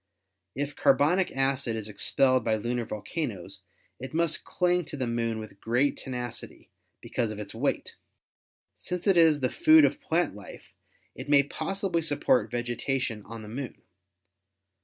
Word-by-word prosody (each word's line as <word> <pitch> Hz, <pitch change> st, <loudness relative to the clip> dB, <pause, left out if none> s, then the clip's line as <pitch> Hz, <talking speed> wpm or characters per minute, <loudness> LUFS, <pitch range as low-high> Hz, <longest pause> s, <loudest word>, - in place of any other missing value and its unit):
If 140 Hz, +1 st, -3 dB
carbonic 175 Hz, +8 st, +3 dB
acid 135 Hz, -3 st, +1 dB
is 110 Hz, -2 st, -4 dB
expelled 130 Hz, +5 st, +2 dB
by 110 Hz, -1 st, +2 dB
lunar 120 Hz, +2 st, -2 dB
volcanoes 100 Hz, -, -5 dB, 0.4 s
it 130 Hz, +4 st, -7 dB
must 165 Hz, -1 st, +1 dB
cling 180 Hz, 0 st, +1 dB
to 145 Hz, -, -7 dB
the 130 Hz, -, -1 dB
Moon 115 Hz, -1 st, -1 dB
with 110 Hz, -2 st, -9 dB
great 125 Hz, +5 st, +1 dB
tenacity 125 Hz, -3 st, -6 dB, 0.3 s
because 115 Hz, -2 st, -2 dB
of 105 Hz, -, -6 dB
its 105 Hz, -, -5 dB
weight. -, -, -2 dB, 0.8 s
Since 180 Hz, -1 st, -5 dB
it 195 Hz, -3 st, +4 dB
is 160 Hz, -4 st, +5 dB
the 125 Hz, -, +1 dB
food 315 Hz, -1 st, +6 dB
of 295 Hz, -, -1 dB
plant 175 Hz, -7 st, 0 dB
life, 100 Hz, -1 st, -12 dB, 0.4 s
it -, -, -9 dB
may 140 Hz, -1 st, +6 dB
possibly 170 Hz, +4 st, -2 dB
support 130 Hz, -7 st, +2 dB
vegetation 120 Hz, -1 st, -2 dB
on 115 Hz, 0 st, -8 dB
the -, -, -9 dB
Moon. 125 Hz, +2 st, -6 dB
130 Hz, 150 wpm, -28 LUFS, 115-160 Hz, 0.8 s, food